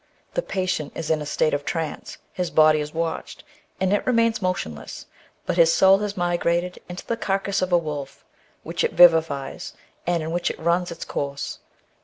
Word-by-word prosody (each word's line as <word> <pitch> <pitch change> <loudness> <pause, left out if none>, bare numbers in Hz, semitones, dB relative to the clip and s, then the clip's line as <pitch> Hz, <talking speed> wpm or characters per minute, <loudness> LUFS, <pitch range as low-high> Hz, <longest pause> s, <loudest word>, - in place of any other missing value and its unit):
The - - 0
patient 185 - -2
is 160 -1 -3
in 155 -1 +1
a 150 - -5
state 155 - +1
of 145 0 -1
trance, 160 0 -4 0.2
his 180 -2 -2
body 155 -1 +5
is 150 0 -4
watched, 165 0 -4 0.4
and 190 +1 +1
it 205 - +1
remains 230 -3 +2
motionless, 175 - -4 0.4
but - - -2
his 165 -1 +6
soul 190 +3 +5
has 210 -1 -3
migrated 175 0 0
into 180 +1 -7
the 230 - -1
carcase 195 -2 -1
of 185 0 -1
a 175 - +6
wolf, 145 -4 -5 0.4
which - - -2
it - - 0
vivifies, 160 -6 +3 0.3
and 175 -2 +1
in 160 - -4
which 175 +1 0
it - - -5
runs 170 +2 +1
its 165 - -7
course. 140 0 -4
170 Hz, 185 wpm, -23 LUFS, 155-185 Hz, 0.4 s, his